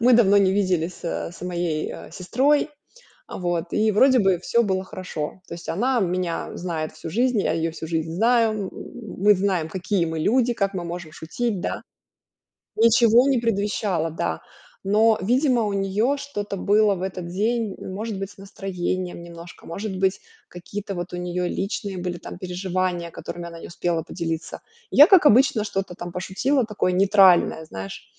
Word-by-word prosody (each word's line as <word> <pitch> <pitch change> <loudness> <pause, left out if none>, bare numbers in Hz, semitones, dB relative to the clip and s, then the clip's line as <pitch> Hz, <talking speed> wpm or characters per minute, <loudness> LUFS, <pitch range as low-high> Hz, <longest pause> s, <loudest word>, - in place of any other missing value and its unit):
мы 245 +2 +5
давно 205 -4 +6
не 190 -1 +4
виделись, 185 -4 -1
а, 170 - -3
с - - -14
моей, 175 -3 -2
а, - - -10
сестрой, 265 - +1 0.6
а, - - -7
вот. 175 -1 -1
И 215 0 +3
вроде 260 +4 +5
бы 190 -4 +3
всё 235 +5 +2
было 190 -3 0
хорошо. 185 -2 -6
То - - -7
есть 170 - -9
она 245 +7 +1
меня 180 -2 -1
знает 165 -3 -4
всю 155 +1 -8
жизнь, 240 +3 +1
я - - 0
её 165 0 -1
всю 160 0 -7
жизнь 160 -1 -2
знаю, 230 +4 +3
м, 205 -3 -3 0.5
мы 205 +2 +5
знаем, 185 -4 0
какие 185 0 -1
мы 160 -1 -3
люди, 240 +6 +2
как 200 -3 -1
мы 180 -2 -3
можем 170 -2 -6
шутить, 200 +6 -3
да. - - -3 1.0
Ничего 230 +3 +5
не 270 - +3
предвещало, 200 -6 0
да. 80 - -3 0.4
Но, 215 +2 +4
видимо, 250 +2 +2
у 205 - -1
неё 200 +8 +1
что-то 205 -8 -5
было 205 +1 +3
в 180 - -6
этот 185 -2 -4
день, 215 +3 -1
может 205 +2 -5
быть, 195 0 -5
с - - -18
настроением 185 -2 -4
немножко, 170 0 -12
может 195 +3 -5
быть, 190 0 +1 0.3
какие-то 195 +3 -6
вот 175 +1 -5
у - - -4
неё 180 0 -2
личные 195 0 -3
были 175 -1 -4
там - - -9
переживания, 180 -1 -2
которыми 175 +1 -7
она 170 -1 -9
не - - -9
успела 170 -1 -1
поделиться. 165 -1 -5 0.3
И - - -4
я, 290 +3 +11
как 370 -5 +6
обычно, 255 -3 +5
что-то 195 -3 -3
там 175 0 -7
пошутила, 240 +9 0
такое 210 -4 0
нейтральное, 190 -4 +5
знаешь. 95 -7 -8
190 Hz, 175 wpm, -23 LUFS, 175-215 Hz, 1.0 s, я